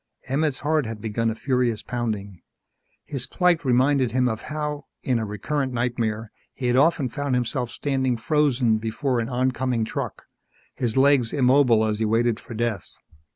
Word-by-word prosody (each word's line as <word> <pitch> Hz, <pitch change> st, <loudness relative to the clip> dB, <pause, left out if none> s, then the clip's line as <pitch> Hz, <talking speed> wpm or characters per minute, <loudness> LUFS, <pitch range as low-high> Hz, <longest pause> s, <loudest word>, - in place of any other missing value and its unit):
Emmett's 140 Hz, +1 st, 0 dB
heart 150 Hz, -3 st, +1 dB
had 110 Hz, -1 st, -6 dB
begun 115 Hz, +1 st, -1 dB
a 110 Hz, -, -3 dB
furious 125 Hz, -4 st, 0 dB
pounding. 105 Hz, -7 st, -4 dB, 0.6 s
His 135 Hz, -5 st, -3 dB
plight 180 Hz, -3 st, +2 dB
reminded 130 Hz, -1 st, +3 dB
him 130 Hz, 0 st, +2 dB
of 110 Hz, -2 st, -2 dB
how, 150 Hz, -1 st, -4 dB, 0.2 s
in 125 Hz, -3 st, +1 dB
a 110 Hz, -, -2 dB
recurrent 130 Hz, +6 st, -2 dB
nightmare, 115 Hz, -2 st, -2 dB, 0.2 s
he 130 Hz, -, -5 dB
had 120 Hz, 0 st, +2 dB
often 145 Hz, 0 st, +3 dB
found 140 Hz, 0 st, -2 dB
himself 125 Hz, 0 st, -1 dB
standing 130 Hz, -1 st, -1 dB
frozen 125 Hz, -4 st, +2 dB
before 120 Hz, +3 st, -1 dB
an 115 Hz, +1 st, -2 dB
oncoming 125 Hz, -2 st, 0 dB
truck, -, -, -5 dB, 0.5 s
his 120 Hz, -1 st, -2 dB
legs 135 Hz, -3 st, +4 dB
immobile 125 Hz, -4 st, +4 dB
as 105 Hz, -1 st, -1 dB
he 110 Hz, -, +1 dB
waited 115 Hz, +1 st, +1 dB
for 120 Hz, -, -9 dB
death. 110 Hz, -6 st, -2 dB
125 Hz, 160 wpm, -24 LUFS, 115-140 Hz, 0.6 s, legs